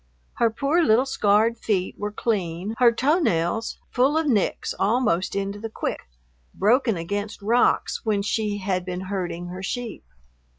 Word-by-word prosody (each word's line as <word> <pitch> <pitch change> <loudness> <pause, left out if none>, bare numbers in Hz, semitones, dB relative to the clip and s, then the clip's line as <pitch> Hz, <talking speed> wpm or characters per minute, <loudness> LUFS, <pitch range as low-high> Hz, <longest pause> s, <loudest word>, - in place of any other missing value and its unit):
Her 230 - +3
poor 280 +9 +1
little 235 0 +4
scarred 220 -2 +2
feet 190 -5 -1
were 210 0 -4
clean, 195 -3 -2
her 245 -2 +6
toe 280 +9 +2
nails 180 - 0
full 270 +5 +2
of 320 - +1
nicks 225 -9 0
almost 205 -5 +1
into 200 +1 -2
the 225 +1 -5
quick, 140 - -4 0.5
broken 230 0 +2
against 205 +5 -4
rocks 235 +4 +2
when 210 -3 0
she 210 0 -1
had 190 -2 -1
been 180 0 -4
herding 175 -3 -4
her 185 +1 -7
sheep. 230 - -4
210 Hz, 155 wpm, -24 LUFS, 190-235 Hz, 0.5 s, her